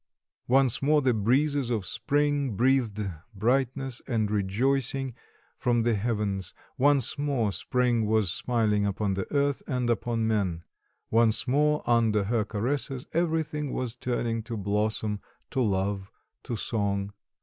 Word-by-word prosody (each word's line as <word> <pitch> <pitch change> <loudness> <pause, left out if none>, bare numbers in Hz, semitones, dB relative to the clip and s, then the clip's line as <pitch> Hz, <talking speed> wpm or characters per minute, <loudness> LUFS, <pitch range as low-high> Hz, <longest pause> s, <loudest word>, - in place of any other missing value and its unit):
Once 130 -1 +3
more 150 +2 +4
the 130 -3 +2
breezes 130 +5 +1
of 110 -5 -1
spring 140 +2 0
breathed 115 -4 +1 0.3
brightness 130 +4 0
and 110 -4 0
rejoicing 130 +6 0 0.5
from 120 -3 +2
the 120 0 +2
heavens; 100 -3 -2 0.2
once 140 -1 +3
more 135 -8 0
spring 120 0 0
was 110 -4 +2
smiling 110 -4 +1
upon 100 0 0
the 95 0 -4
earth 140 -1 +1
and 125 -4 0
upon 115 0 -1
men; 95 -7 0 0.5
once 115 +1 +3
more 150 +3 +2
under 115 -3 +3
her 110 +2 +1
caresses 130 +5 -2
everything 160 -4 0
was 125 -2 -3
turning 120 -2 -2
to 115 +1 -5
blossom, 105 +1 -1 0.3
to 130 - 0
love, 100 -2 0 0.3
to 120 - -4
song. 100 -2 -1
115 Hz, 130 wpm, -27 LUFS, 105-135 Hz, 0.5 s, more